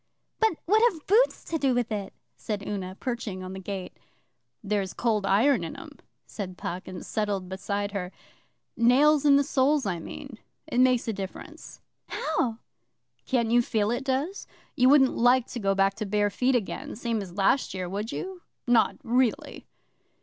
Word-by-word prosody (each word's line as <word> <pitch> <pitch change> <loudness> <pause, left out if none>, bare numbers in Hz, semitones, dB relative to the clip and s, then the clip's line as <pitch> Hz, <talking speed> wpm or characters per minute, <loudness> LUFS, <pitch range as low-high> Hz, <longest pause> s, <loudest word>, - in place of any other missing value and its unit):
'But 440 -7 +2
what 430 +5 +4
have 320 -5 -13
boots 460 +6 +3
to 325 - -3
do 270 -3 +2
with 240 -2 -1
it?' 200 -2 -3 0.2
said 205 -2 -5
Una, 190 -2 -4
perching 230 -7 -4
on 185 0 -7
the 190 - -6
gate. 190 -1 -6 0.6
'There's 200 -2 -2
Cold 215 -4 0
Iron 220 +2 +3
in 165 - -5
them,' - - -11 0.3
said 185 -4 -7
Puck, 180 +2 -5
and 185 -2 -7
settled 205 -4 -2
beside 200 +2 -3
her. 185 -3 -4 0.6
'Nails 280 +5 +4
in 285 -1 +7
the 280 - +4
soles, 280 0 +2
I 180 -4 -1
mean. 235 +7 -9 0.3
It 240 - -1
makes 255 -2 +3
a 225 - 0
difference.' 195 -1 -8 0.3
'How?' 250 -7 -1 0.7
'Can't 235 -4 +1
you 240 +1 +5
feel 215 -2 0
it 240 +3 -2
does? 275 +9 -2 0.3
You 255 -2 +5
wouldn't 270 -2 +5
like 245 +1 +4
to 245 - -5
go 195 -2 +1
back 195 0 +3
to 215 - -3
bare 205 0 +1
feet 255 +5 +1
again, 225 -6 -3
same 230 -1 -2
as 185 -3 -8
last 200 +3 +1
year, 185 -1 -3
would 205 +5 -4
you? 375 -1 -6 0.2
Not 240 -2 +3
really? 245 -2 0
225 Hz, 175 wpm, -27 LUFS, 195-260 Hz, 0.7 s, in